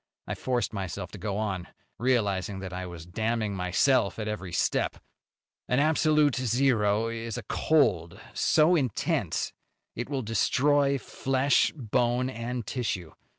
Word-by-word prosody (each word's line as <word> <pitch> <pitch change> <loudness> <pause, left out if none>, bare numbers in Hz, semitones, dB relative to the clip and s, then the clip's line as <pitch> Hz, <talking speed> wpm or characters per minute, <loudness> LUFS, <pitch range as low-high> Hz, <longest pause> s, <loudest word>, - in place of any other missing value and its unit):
I - - -3
forced 120 -4 -1
myself 95 -2 -5
to 100 - -9
go 100 +1 -3
on, 95 -5 -2 0.3
realizing 105 -6 +1
that 95 -1 -6
I 90 0 -4
was 85 -2 -9
damning 110 +3 -1
myself 100 +5 +2
at 110 -1 -4
every 95 -4 -4
step. - - 0 0.7
"An 125 - +1
absolute 150 -2 +3
zero 115 -4 +2
is 115 -1 -4
a - - -5
cold 100 - +1
so 160 +3 +4
intense 130 - -1 0.4
it 120 +3 -4
will 135 -3 -2
destroy 140 +6 +2
flesh, 135 +1 +1
bone 125 0 0
and 120 -1 -4
tissue. 95 -10 -3
115 Hz, 135 wpm, -28 LUFS, 100-130 Hz, 0.7 s, so